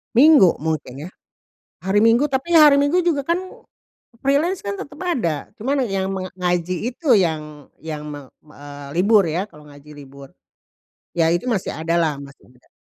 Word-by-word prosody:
Minggu 275 - +6
mungkin 150 -3 -4
ya, - - -11 0.8
hari 205 +2 +2
Minggu 230 +5 +4
tapi 285 +4 -1
hari 295 -2 +7
Minggu 330 +6 +2
juga 310 -5 +1
kan, 340 +5 0 0.9
freelance 310 +7 +1
kan 200 - -3
tetep 290 +6 -9
ada 215 - -2
cuman 270 +5 -1
yang 190 -1 -2
menga 185 -1 -5
ngaji 180 0 -1 0.2
itu 290 -4 +1
yang 150 -5 -3
yang 155 -2 -6
meng 145 -2 -9 0.2
eee, 145 -1 -11
libur 205 +1 +4
ya 180 +6 -2
kalau 150 0 -17
ngaji 145 +1 -15
libur, 140 -1 -13 0.9
ya 165 -1 +2
itu 175 +6 -1
masih 205 -6 -2
ada 165 +2 -2
lah 155 -3 0
masih 140 -1 -15
ada. 125 -1 -27
185 Hz, 165 wpm, -20 LUFS, -, 0.9 s, hari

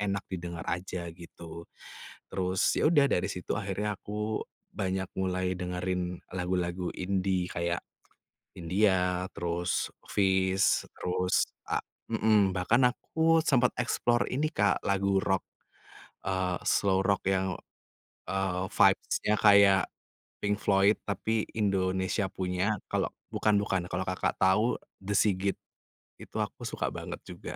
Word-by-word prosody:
enak 100 -1 -1
didengar 85 -2 -5
aja, 90 -1 -3
gitu. 85 -1 -10 0.7
Terus, 95 0 0
ya - - +3
udah 145 -4 +5
dari 90 +1 +1
situ 90 -2 -4
akhirnya 105 0 -2
aku 105 +1 -3 0.3
banyak 95 0 -1
mulai 95 0 0
dengerin 90 0 -3 0.2
lagu-lagu 90 -1 -1
indie 95 -1 0
kayak, 85 +1 -1 0.8
Hindia, 90 0 +1
terus 85 +1 -1 0.2
Feast, 95 -1 +2 0.2
terus 90 +1 +1 0.2
a - - +1 0.3
hmm. 105 -3 +4
Bahkan 115 +8 +3
aku 165 +3 +2
sempet 125 -5 +4
explore 120 0 +1
ini 155 +4 +1
Kak, 100 0 +2
lagu 100 0 +1
rock, 95 -1 0 0.8
eee, 95 -1 -1
slow 95 -1 +3
rock 100 0 +1
yang, 95 -3 +1 0.7
eee, 95 -1 -1
vibes-nya 105 - +3
kayak 100 -2 +7 0.6
Pink 105 0 +2
Floyd, 100 +1 +4
tapi 110 +2 0
Indonesia 95 -1 +1
punya, 90 +3 -1 0.2
kalau - - +1 0.3
bukan-bukan, 100 -4 +1
kalau 90 +1 -1
Kakak 95 0 -1
tahu 100 +6 +4 0.3
The 100 +2 -2
S.I.G.I.T. 100 -1 +2 0.7
Itu - - -6
aku - - -8
suka - - -2
banget - - -6
juga. - - -10
95 Hz, 120 wpm, -29 LUFS, 90-100 Hz, 0.8 s, kayak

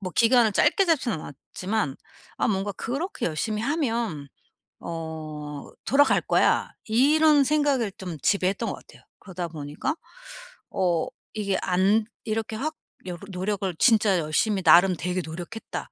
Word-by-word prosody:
뭐 185 -2 -5
기간을 230 -2 +4
짧게 390 - +3
잡지는 260 - +1
않았지만 180 +3 -4 0.4
아 - - +1
뭔가 205 -1 -1
'그렇게 275 - -4
열심히 210 +7 -1
하면 230 - -1 0.5
어 155 -3 -6 0.2
돌아갈거야.' 285 +2 +3
이런 290 +5 +4
생각을 280 -6 +1
좀 180 -4 -6
지배했던 195 -1 +1
것 - - -3
같아요. - - -17 0.2
그러다 180 -2 -5
보니까 155 - -4 0.8
어 175 -4 +1 0.3
이게 200 -3 -1
안 195 +4 +2 0.2
이렇게 220 0 -2
확 310 +7 -3 0.3
여러 175 -2 -6
노력을 190 0 -2
'진짜 215 -5 +4
열심히 185 +6 0
나름 175 +3 +6
되게 180 +2 -2
노력했다. 175 - -7
200 Hz, 285 characters per minute, -25 LUFS, 170-235 Hz, 0.8 s, 나름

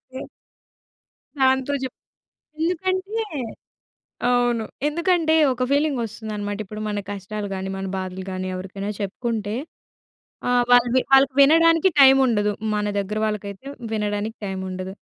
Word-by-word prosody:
Yeah! - - -6 1.1
దాంతో 265 +1 +2
జెప్ 260 - -5 0.7
ఎందుకంటే 375 +5 -1 1.1
అవును. 245 -2 +2 0.2
ఎందుకంటే, 335 0 +2 0.2
ఒక 255 0 -4
ఫీలింగొస్తుందనమాట, 220 -8 -1
ఇప్పుడు 215 +2 -8
మన 205 0 -2
కష్టాలు 205 +1 -5
గాని, 190 0 -4
మన 195 - -4
బాధలు 185 0 -5
గాని, 185 0 -4
ఎవరికైనా 195 +2 -5
చెప్పుకుంటే, 210 +1 -3 1.0
ఆహ్, 245 0 +4
వాళ్ళు 245 0 +6
వి 260 - +5
వాళ్ళకి 270 0 +6
వినడానికి 330 +4 +5
టైముండదు. 255 -6 +5 0.2
మన 210 0 0
దెగ్గర 200 +2 -2
వాళ్ళకైతే, 210 +3 -4 0.3
వినడానికి 210 +1 -2
టైముండదు. 190 0 -5
220 Hz, 110 wpm, -23 LUFS, 205-270 Hz, 1.1 s, వాళ్ళు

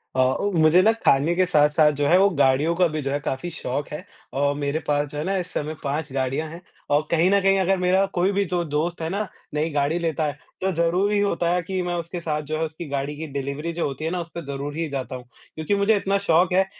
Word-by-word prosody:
अ, - - 0
ओ, 130 +11 +2
मुझे 165 +1 +5
ना 220 +3 +5
खाने 160 -6 +2
के 185 0 +3
साथ-साथ 150 -2 +4
जो 145 - +1
है 180 - +5
वो 200 +1 +5
गाड़ियों 145 +1 +2
का 180 0 +4
भी 155 -1 -3
जो 135 0 -2
है, 145 - 0
काफ़ी 145 +4 -3
शौक 145 -2 -4
है 150 +6 -7 0.3
और 140 +1 +1
मेरे 145 +2 -1
पास 145 0 +1
जो 145 - -8
है 150 - -2
ना, 195 +2 -1
इस 180 -1 -4
समय 155 +1 -3
5 145 0 -2
गाड़ियाँ 135 +4 -1
हैं। 170 +2 -10 0.3
और 150 +1 +3
कहीं 170 +2 +3
न 200 0 +4
कहीं 195 0 +3
अगर 190 +1 +2
मेरा 185 +2 +3
कोई 180 +3 +2
भी 200 0 +1
जो 175 -1 +1
दोस्त 160 +3 -2
है 160 - -2
ना, 200 +2 -2 0.3
नई 155 +2 0
गाड़ी 145 +4 0
लेता 160 -2 -1
है 145 -1 -3 0.2
तो 190 0 +1
ज़रूरी 180 +5 +1
होता 175 -4 +1
है 180 - +1
कि 185 +1 -2
मैं 175 0 -2
उसके 170 +1 -5
साथ 150 -2 -2
जो 155 - 0
है, 160 - -1
उसकी 160 +1 -7
गाड़ी 140 +1 -2
की 160 0 -5
डिलीवरी 140 +4 -3
जो 170 - -1
होती 140 +3 -5
है 165 - -1
ना 180 -1 -2
उसपे 170 0 -7
ज़रूर 140 +1 -5
ही 165 -1 -1
जाता 130 -1 -4
हूँ, 125 -1 -9 0.3
क्योंकि 160 +6 0
मुझे 200 +2 +3
इतना 200 0 +1
शौक 170 +2 +4
है 190 +1 +4
160 Hz, 260 wpm, -23 LUFS, 145-180 Hz, 0.3 s, मुझे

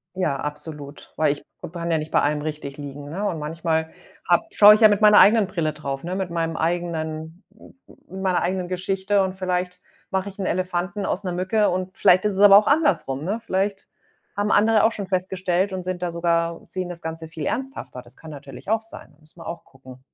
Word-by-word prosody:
Ja, 160 -7 0
absolut, 150 0 -8
weil 150 -2 +2
ich 145 - -13 0.2
b - - -7
kann 170 0 -4
ja 160 - +2
nicht 155 +1 -5
bei - - +3
allem 150 0 0
richtig 150 -2 -6
liegen, 145 0 -8
ne? 190 +6 -4
Und 165 -5 -3
manchmal 160 +1 -2 0.4
habe 175 -1 +3
schaue 210 0 +8
ich 220 - -3
ja 215 - +10
mit 205 0 +1
meiner 210 -1 +7
eigenen 215 -1 +6
Brille 155 -5 -2
drauf, 140 -2 -5
ne? 180 +2 -4
Mit 190 -2 -3
meinem 165 -1 -2
eigenen, 160 0 -3
n 220 - -26
n - - -17
n - - -17 0.2
mit 190 0 -7
meiner 185 -2 +1
eigenen 180 0 -1
Geschichte. 190 +2 0
Und 190 0 -3
vielleicht 180 -1 -2 0.3
mache 190 +1 -2
ich 195 - -16
'n 190 - -2
Elefanten 185 +2 -2
aus 200 - -2
'ner 180 -2 -3
Mücke 195 +4 +1
und 185 +2 -3
vielleicht 185 +3 +4
ist 210 - +1
es - - -3
aber 200 -1 +9
auch 210 - +3
andersrum, 280 - +1
ne? 205 +6 -2
Vielleicht 195 +1 -2 0.5
haben 205 +1 0
andere 215 0 +4
auch 225 - +4
schon 200 -4 -6
festgestellt 185 0 -1
und 185 -1 -4
sind 180 -1 -4
da 175 -1 -2
sogar 170 0 0
sehen 185 -1 -5
das 170 -1 -8
Ganze 160 0 -6
viel 160 -2 -6
ernsthafter. 265 - -4
Das 120 +1 -20
kann 160 -1 -12
natürlich 140 +5 -10
auch 220 0 +2
sein, 160 -8 -12
muss 155 +1 -21
man 165 - -12
auch 170 0 -7
gucken. 130 -1 -15
180 Hz, 225 wpm, -23 LUFS, 160-195 Hz, 0.5 s, ja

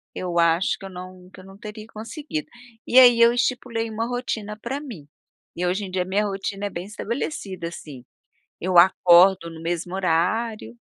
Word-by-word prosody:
eu 175 -2 -2
acho 170 +2 +2
que - - -10
eu 195 - -7
não 185 0 -11
que 195 - -14
eu - - -12
não 195 0 -14
teria 215 0 -9
conseguido. 290 +8 -6 0.4
E 255 - +6
aí 245 -2 +7
eu 235 0 +7
estipulei 240 -2 -1
uma 225 +2 -3
rotina 220 -4 -4
pra 265 +5 -4
mim, 195 - -10 0.5
e 180 - -2
hoje 190 +3 -1
em 185 - -9
dia 185 -1 0
minha 200 +3 0
rotina 195 0 -4
é - - -2
bem 175 -1 -6
estabelecida, 205 - -5
assim, 145 -6 -10 0.6
eu 185 0 +1
acordo 180 0 +6
no 165 -1 -11
mesmo 175 +2 -3
horário. 190 - -1
195 Hz, 185 wpm, -23 LUFS, 180-225 Hz, 0.6 s, aí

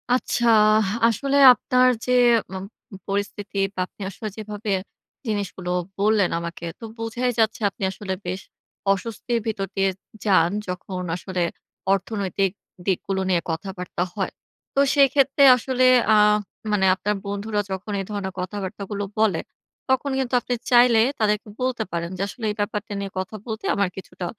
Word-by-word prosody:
আচ্ছা, 240 -1 0 0.3
আহ 215 -3 +2 0.2
আসলে 275 +5 +1 0.2
আপনার 255 +1 +3 0.2
যে, 250 - -1 0.4
অম 190 0 -5 0.3
মম 195 - -8
পরিস্থিতি 200 0 -3 0.2
বা, - - -5
আপনি - - -18
আসলে 215 +3 -7
যেভাবে 210 0 -5 0.6
জিনিসগুলো 190 -4 -3 0.3
বললেন 205 -2 +3
আমাকে। 170 0 -6
তো - - -13
বোঝাই 230 +2 -1
যাচ্ছে 220 0 +2
আপনি 195 - -9
আসলে 190 0 -5
বেশ 185 +2 -3 0.5
অস্বস্তির 230 +4 -2
ভিতর 195 -3 -2
দিয়ে 195 0 +2 0.4
যান। 185 -5 +4 0.2
যখন 180 0 -5
আসলে 185 0 -4 0.5
অর্থনৈতিক 195 -1 -1 0.3
দিকগুলো 190 0 0
নিয়ে 175 -2 +2
কথাবার্তা 180 +1 -4
হয়। 195 - -2 0.4
তো - - +3 0.2
সেইক্ষেত্রে 275 0 +4
আসলে 255 +1 +1 0.3
আ - - +6 0.6
মানে 195 -2 +2
আপনার 210 +2 -1
বন্ধুরা 205 +1 -2
যখন 190 +3 -4
এই 195 - -6
ধরনের 195 -2 -3
কথাবার্তাগুলো 200 +1 -4 0.2
বলে 205 -7 +3 0.5
তখন 265 +2 +1
কিন্তু 260 -1 -2
আপনি 250 - -3 0.2
চাইলে 240 -2 +6 0.2
তাদেরকে 210 0 +1
বলতে 255 -3 0
পারেন 170 0 -2
যে, - - -4
আসলে, 230 +2 -10
"এই 210 - -6
ব্যাপারটা 210 0 -2
নিয়ে 195 -1 -4
কথা 190 +3 -5
বলতে 220 -2 -5
আমার 200 -2 +1
কিছুটা 185 -1 -7
205 Hz, 150 wpm, -23 LUFS, 190-225 Hz, 0.6 s, আ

